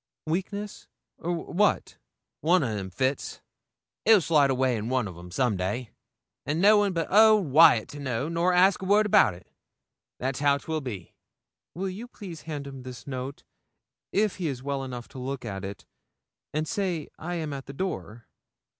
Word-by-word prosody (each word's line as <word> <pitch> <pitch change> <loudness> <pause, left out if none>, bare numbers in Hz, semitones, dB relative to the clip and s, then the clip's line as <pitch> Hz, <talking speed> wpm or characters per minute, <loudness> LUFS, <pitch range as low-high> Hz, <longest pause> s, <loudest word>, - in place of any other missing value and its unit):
'Weakness, 195 +5 -4 0.3
or 175 +2 -2 0.2
what?' 205 +3 +1 0.4
'One 175 +2 +3
o' 115 -5 -1
them 95 -2 -4
fits. 130 +9 -2 0.6
He'll 220 -1 +7
slide 150 -5 +3
awa' 130 0 +2
in 115 -2 -1
one 130 -4 +1
o' 95 - -7
them 90 +1 -11
some 120 +3 +1
day, 100 +6 -3 0.5
and 150 +4 -1
no 210 +3 +6
one 205 -1 +2
but 165 -3 -2
old 215 -6 +6
Wyat 150 -6 +7
to 145 - -9
know 130 -1 -2
nor 170 +2 +1
ask 185 +2 +4
word 205 +3 +3
about 195 - +5
it; 90 - -15 0.7
that's 130 0 -2
how 140 -1 +3
'twill 155 +2 -3
be.' 105 -10 -7 0.6
'Will 190 +3 -2
you 210 +6 -7
please 185 -9 -9
hand 145 -2 -4
him 135 -1 -8
this 125 -1 -9
note, 130 0 -6 0.7
if 210 0 +1
he 175 - -2
is 130 -3 -4
well 140 -1 -2
enough 125 -2 -6
to 130 - -9
look 130 0 -4
at 100 -3 -5
it, 100 0 -7 0.7
and 155 +1 -2
say 185 -5 -2
I 175 +2 -4
am 155 -3 -3
at 135 -1 -7
the - - -6
door?' 120 - -5
145 Hz, 180 wpm, -27 LUFS, 125-180 Hz, 0.7 s, He'll